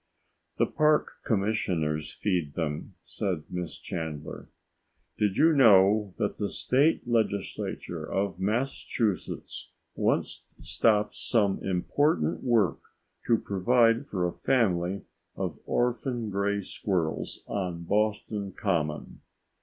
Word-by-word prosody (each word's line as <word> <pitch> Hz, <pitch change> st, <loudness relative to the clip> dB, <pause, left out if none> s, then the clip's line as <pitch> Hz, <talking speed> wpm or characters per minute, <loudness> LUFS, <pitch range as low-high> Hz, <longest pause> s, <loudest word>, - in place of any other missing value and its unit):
"The -, -, +4 dB
park 150 Hz, 0 st, +2 dB
commissioners 90 Hz, -, 0 dB
feed 85 Hz, -8 st, -1 dB
them," 75 Hz, -3 st, -3 dB
said 90 Hz, -6 st, -3 dB
Miss 90 Hz, -2 st, -4 dB
Chandler. 80 Hz, -3 st, -6 dB, 0.7 s
"Did 105 Hz, -3 st, +1 dB
you 160 Hz, +2 st, +5 dB
know 105 Hz, -6 st, +5 dB
that 105 Hz, -3 st, -1 dB
the 100 Hz, -1 st, -1 dB
State 140 Hz, +1 st, +2 dB
legislature 100 Hz, -7 st, -2 dB
of 95 Hz, -2 st, -1 dB
Massachusetts 110 Hz, 0 st, -2 dB, 0.2 s
once -, -, -1 dB
stopped 105 Hz, -2 st, +2 dB
some 105 Hz, -5 st, +1 dB
important 90 Hz, -, +1 dB
work 115 Hz, -7 st, +2 dB, 0.5 s
to 115 Hz, -, +5 dB
provide 115 Hz, +6 st, +2 dB
for 90 Hz, -3 st, -1 dB
a 85 Hz, -, -4 dB
family 95 Hz, -7 st, +1 dB, 0.3 s
of -, -, -4 dB
orphan 120 Hz, -2 st, -1 dB
gray 100 Hz, +1 st, 0 dB
squirrels 90 Hz, -5 st, -2 dB
on 90 Hz, -4 st, -3 dB
Boston 105 Hz, 0 st, -1 dB
Common?" 80 Hz, -8 st, -2 dB
100 Hz, 105 wpm, -28 LUFS, 90-115 Hz, 0.7 s, you